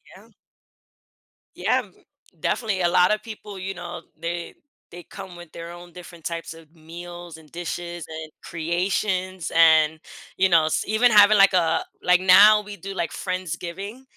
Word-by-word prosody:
Yeah. - - -17 1.3
Yeah, - - +1
m - - -22 0.5
definitely 210 -6 -1
a 175 - +3
lot 180 +4 +4
of 215 - -4
people, 210 -3 -9
you 190 +1 -5
know, 175 -1 -8 0.2
they 170 0 -5 0.4
they 175 0 -10
come 180 +2 -10
with 175 -2 -12
their 170 0 -8
own 175 0 -12
different 175 -2 -13
types 165 -1 -5
of 165 0 -17
meals, 175 +1 -10
and 155 -2 -18
dishes, 175 0 -6
and 160 -1 -8
creations, 185 +2 -2
and, 160 -1 +5 0.4
you 190 - +4
know, 165 -3 +4
s 155 - 0
even 225 +3 +3
having, 210 0 +7
like, 195 -1 +6
a, 165 -3 +2 0.2
like 180 0 +4
now 205 +3 +7
we 205 -1 -10
do, 195 0 -7
like, 170 -3 -3
Friendsgiving, 185 - -5
175 Hz, 160 wpm, -23 LUFS, 170-195 Hz, 1.3 s, having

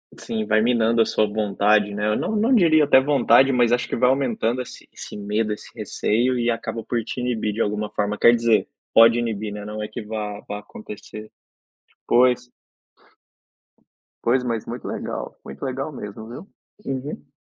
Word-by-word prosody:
Sim, 220 -1 -4
vai 110 - +3
minando 115 -1 +2
a - - +4
sua 110 - +1
vontade, 105 0 +1
né? 105 +1 -1
Eu 105 - +2
não - - -2
não 230 +5 +3
diria 155 -7 +5
até 130 -2 +6
vontade, 135 -2 +4
mas 120 -2 +3
acho 125 - 0
que - - -1
vai 125 +1 +3
aumentando 125 -2 0
esse 125 - -11
esse - - -9
medo, 105 +2 -1
esse 105 - -10
receio 125 +4 0
e 120 0 +1
acaba 115 0 -3
por 120 0 -2
te 125 - -6
inibir 115 -4 -1
de 110 - -2
alguma 105 0 -1
forma. 105 0 -1
Quer 120 - +6
dizer, 115 -2 +2 0.3
pode 115 +1 +7
inibir, 110 -3 -3
né? 105 0 -7
Não 105 0 -5
é 105 - -4
que 120 - -7
vá 105 -1 -5
vá 105 0 -4
acontecer. 105 +1 -10 0.8
Pois. 125 0 +3 1.8
Pois, 125 +2 +2
mas 115 -3 -2
muito 120 0 -6
legal, - - -5
muito 70 - -10
legal 135 +3 -3
mesmo, 110 -4 -8
viu? 125 - -9 0.4
Uhum. 135 +2 -5
115 Hz, 180 wpm, -22 LUFS, 105-125 Hz, 1.8 s, pode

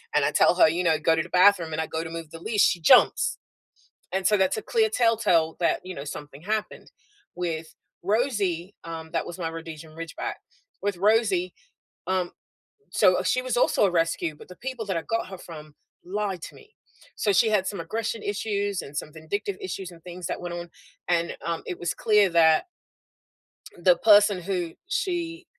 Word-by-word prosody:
and - - +4
I - - +2
tell - - +4
her, - - +6
you 170 +3 -1
know, 165 -3 +3
go 165 - +2
to 160 - 0
the 170 - -12
bathroom 180 -3 +4
and 160 - -1
I 160 - -3
go 160 0 -3
to 165 - -6
move 165 -1 -7
the 165 - -9
leash, 210 +4 0
she 175 - +3
jumps, 160 - +5 0.8
and 190 0 0
so 210 - +4
that's 190 -1 +2
a 215 - -4
clear 450 -2 +2
telltale 215 - +2
that, 170 - +2
you 185 0 -6
know, 140 - -6
something 145 -1 -8
happened. 215 +3 -3 0.4
With 165 -3 -4 0.3
Rosie- 200 -4 0
um, 165 -1 -7
that 165 - -1
was 175 - -7
my 165 -2 -2
Rhodesian 160 -1 -9
Ridgeback- 165 +1 -5 0.5
with 205 -2 -1
Rosie, 200 -2 +2 0.6
um, 185 -1 0 0.6
so 185 0 +4
she 190 +7 +1
was 255 -1 -2
also 240 - +3
a - - +1
rescue, 165 -1 0
but - - -14
the 180 - -12
people 255 -1 -5
that 190 -3 -1
I - - -4
got 225 +1 -2
her 190 -1 -8
from 155 -3 -11 0.3
lied 195 -1 -3
to - - -8
me. 430 - -18 0.4
So, 205 - +1
she 220 +4 +4
had 205 -3 +2
some 200 - -3
aggression 225 0 -3
issues 205 -1 -2
and 140 - -10
some 150 - -4
vindictive 190 +5 -4
issues 185 0 -5
and 170 -1 -15
things 180 -1 -7
that - - -3
went 175 -1 -5
on, 175 0 -7 0.4
and, 170 -1 0
um, 170 -1 -3
it 180 - -5
was 175 - -2
clear 210 -2 +4
that 160 - +5 1.1
the 175 0 +4
person 205 -2 +5
who 175 -2 -2 0.2
she 355 -6 -2
180 Hz, 195 wpm, -26 LUFS, 165-210 Hz, 1.1 s, her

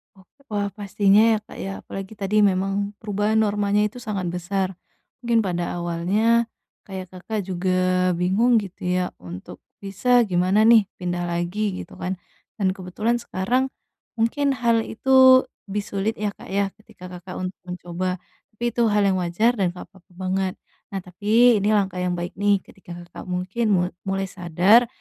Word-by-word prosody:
Oh. 190 - -19 0.2
Wah, 205 -2 -2
pastinya 205 +2 +3
ya, - - 0
Kak, - - -13
ya. 195 - -4
Apalagi 195 +2 -7
tadi 210 +1 0
memang 200 +1 +1
perubahan 210 +1 0
normanya 205 0 +1
itu 215 +4 -3
sangat 195 -6 -3
besar. 185 +1 -2 0.4
Mungkin 235 -3 +2
pada 175 -2 -2
awalnya, 195 +7 +1 0.4
kayak 190 -2 -7
Kakak 200 +3 -4
juga 185 0 +1
bingung 195 +8 +3
gitu 190 -3 -10
ya 180 0 0
untuk 90 +1 -9 0.2
bisa 240 +5 +3
gimana 185 +1 +2
nih, 220 -3 +6
pindah 175 -1 -3
lagi 180 +4 -1
gitu - - -15
kan. 185 +1 -2 0.4
Dan 195 -3 +1
kebetulan 205 +5 -2
sekarang 240 +4 0 0.5
mungkin 270 +5 +1
hal 230 -2 +2
itu 260 +2 +6 0.2
lebih 205 +1 -2
sulit 200 +2 -2
ya, 210 -1 -2
Kak, - - -14
ya 195 0 0
ketika 180 -3 -13
Kakak 180 +1 -9
untuk 185 +1 -5
mencoba. 180 +1 -3 0.4
Tapi 235 - -8
itu 235 0 +2
hal 210 -1 +3
yang 190 -2 +2
wajar 180 +7 +2
dan 185 - +2
enggak - - -7
apa-apa 190 -1 -22
banget. 185 0 -1 0.3
Nah, 195 -2 -5
tapi 215 +5 +3
ini 200 - 0
langkah 190 -3 0
yang 180 -1 0
baik 175 0 -4
nih. 200 -2 +2
Ketika 175 -3 -12
Kakak 175 - -11
mungkin 185 +6 -2
mul 180 -1 +2 0.2
mulai 195 0 0
sadar 185 +7 +4
195 Hz, 165 wpm, -23 LUFS, 180-215 Hz, 0.5 s, nih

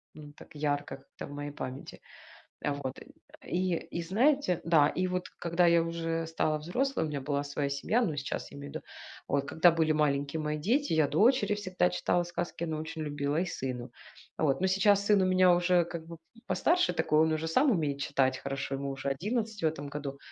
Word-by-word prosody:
ну 150 -1 -11
так 155 - -15
ярко 145 -1 -2
как-то 135 0 -11
в - - -11
моей 145 0 -5
памяти. 130 -1 -7 0.6
А 145 - +1
вот, 135 -2 -5
э, - - -13 0.4
и 180 -1 0 0.2
и 170 - -2
знаете, 220 - +2
да 160 -3 +5
и 185 +4 -1
вот 180 0 -2
когда 170 +1 +2
я 170 0 +5
уже 165 0 -2
стала 155 -1 0
взрослой, 245 - -1
у 155 - -2
меня 145 -2 -3
была 145 +1 -1
своя 140 0 -2
семья, 210 - +1
но 165 -9 0
сейчас 140 -1 -4
я 140 - -9
имею 140 0 -8
в - - -16
виду, - - -7 0.4
вот 140 -1 +1
когда 165 +4 +5
были 160 -1 +2
маленькие 145 0 0
мои 150 0 -2
дети, 250 - +1
я 155 -3 +3
дочери 210 - +3
всегда 185 - 0
читала 175 - 0
сказки, 175 0 -4
она 160 -2 -3
очень 160 0 -5
любила 145 0 -1
и 185 - -1
сыну. 125 -5 -4 0.5
А - - -3
вот, 140 +2 +2
но 190 - +2
сейчас 200 +1 +3
сын 205 -2 +5
у - - +3
меня 185 -1 +5
уже 175 0 +3
как 170 -1 -7
бы, 170 - -8 0.2
м, 230 - -18
постарше 340 - +2
такой, 160 -2 +2
он 160 0 +3
уже 155 +1 -1
сам 260 - +3
умеет 150 - 0
читать 130 -2 +1
хорошо, 135 0 -4
ему 140 0 -4
уже 135 0 -4
11 210 - -2
в - - +3
этом 145 -2 -2
году. 140 -1 -6
160 Hz, 215 wpm, -30 LUFS, 145-180 Hz, 0.6 s, да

